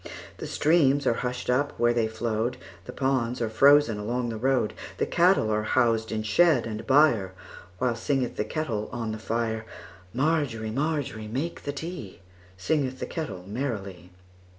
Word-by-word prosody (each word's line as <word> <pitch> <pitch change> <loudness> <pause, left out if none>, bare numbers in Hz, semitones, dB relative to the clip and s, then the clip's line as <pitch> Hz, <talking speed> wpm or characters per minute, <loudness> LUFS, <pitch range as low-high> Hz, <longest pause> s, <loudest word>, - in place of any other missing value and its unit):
The - - -6
streams 145 -3 +3
are 120 - +4
hushed 125 +1 -4
up 140 +4 0
where 120 0 +4
they 115 -2 +1
flowed, 110 +2 -2 0.3
The - - -7
ponds 130 -2 0
are 115 -2 -1
frozen 140 -3 +5
along 120 +3 -2
the 115 - -4
road, 125 -2 +1 0.2
The - - +1
cattle 175 - +3
are 105 0 +1
housed 115 0 +1
in 110 -1 -2
shed 150 +4 +3
and 110 -1 -6
byreWhile 115 - +1
singeth 130 +1 -1
the - - -1
kettle 110 -4 -3
on 115 -3 -3
the 110 - -5
fire. 110 0 -2 0.5
Margery, 130 - 0
Margery, 140 -5 -2
make 135 +10 -4
the 145 - -1
tea, 145 - -7 0.4
Singeth 130 - 0
the - - -3
kettle 115 - -5
merrily. 100 -6 -5
120 Hz, 155 wpm, -26 LUFS, 110-140 Hz, 0.5 s, frozen